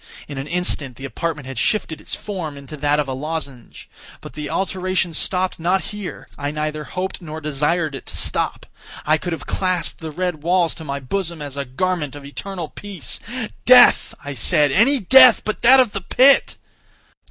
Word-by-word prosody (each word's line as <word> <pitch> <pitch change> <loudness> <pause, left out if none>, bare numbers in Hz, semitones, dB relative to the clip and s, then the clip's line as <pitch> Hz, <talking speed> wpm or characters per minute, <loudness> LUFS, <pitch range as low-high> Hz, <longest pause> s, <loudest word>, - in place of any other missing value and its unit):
In 145 -2 -6
an 135 - -5
instant 155 -7 -2
the 135 - -8
apartment 150 0 -4
had 130 -3 -6
shifted 160 - -1
its - - -3
form 175 -8 -6
into 140 +2 -9
that 145 0 +1
of 150 - -1
a 135 - -3
lozenge. 140 -3 -6 0.3
But - - -11
the 150 -1 -6
alteration 185 -2 -1
stopped 185 +3 -1
not 180 +3 +1
here—I 180 -7 -6
neither 150 0 -4
hoped 185 +4 -5
nor 155 -2 -7
desired 150 +2 -1
it 135 - -8
to - - -5
stop. - - -1 0.4
I 155 +1 +3
could 175 - -4
have 165 - -5
clasped 185 -4 -2
the 160 - -6
red 175 0 -3
walls 175 +1 +2
to 160 - -10
my 140 -2 -4
bosom 170 +5 -3
as 145 -2 -7
a 140 -1 -3
garment 150 +2 -2
of 145 -1 -10
eternal 175 +3 -6
peace. 200 -7 -2 0.4
"Death," 250 0 +6
I 145 - -4
said, 145 +4 +4
"any 260 - +4
death 255 +4 +7
but 215 - -3
that 260 +3 +7
of 250 -5 +3
the 195 - -4
pit!" 265 +8 +4
160 Hz, 185 wpm, -20 LUFS, 145-185 Hz, 0.4 s, death